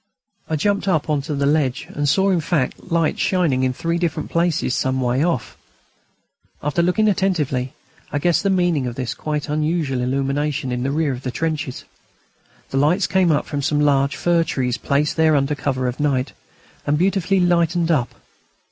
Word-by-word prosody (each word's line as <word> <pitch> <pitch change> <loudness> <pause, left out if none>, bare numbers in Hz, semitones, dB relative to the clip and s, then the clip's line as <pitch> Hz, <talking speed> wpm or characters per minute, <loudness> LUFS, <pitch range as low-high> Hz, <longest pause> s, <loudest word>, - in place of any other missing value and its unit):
I 160 - 0
jumped 200 +6 0
up 160 -4 +1
on 145 -2 +1
to 150 +1 -4
the 140 0 0
ledge 140 -3 +1
and 145 0 0
saw, 195 +5 +3
in 175 -3 +1
fact, 155 -1 -2
lights 165 -2 +1
shining 165 -9 +1
in 130 -1 +1
three 165 +6 -2
different 160 -3 -2
places 170 -6 +1
some 130 0 0
way 125 +2 +1
off. 165 -9 -1 1.1
After 150 +4 +1
looking 180 +5 +2
attentively 155 -10 0 0.4
I - - -1
guessed 170 +3 +2
the 200 - 0
meaning 175 -8 +1
of 120 - -5
this 125 -3 -3
quite 150 -1 -3
unusual 150 -3 -1
illumination 140 +2 -1
in 125 0 -2
the 130 - -1
rear 150 0 0
of 125 - -7
the 130 - -4
trenches. 155 -1 -3 0.9
The 135 - -1
lights 160 +8 +3
came 185 -2 +2
from 145 -1 -4
some 145 +1 0
large 140 -1 +2
fir 170 -1 +2
trees, 125 -6 -1
placed 140 +4 0
there 160 -1 +4
under 140 +1 +1
cover 130 -2 -1
of 125 - -4
night, 140 -3 0 0.5
and 145 +1 +2
beautifully 195 +2 +1
lighted 170 -1 +2
up. 135 -7 0
150 Hz, 180 wpm, -21 LUFS, 135-170 Hz, 1.1 s, there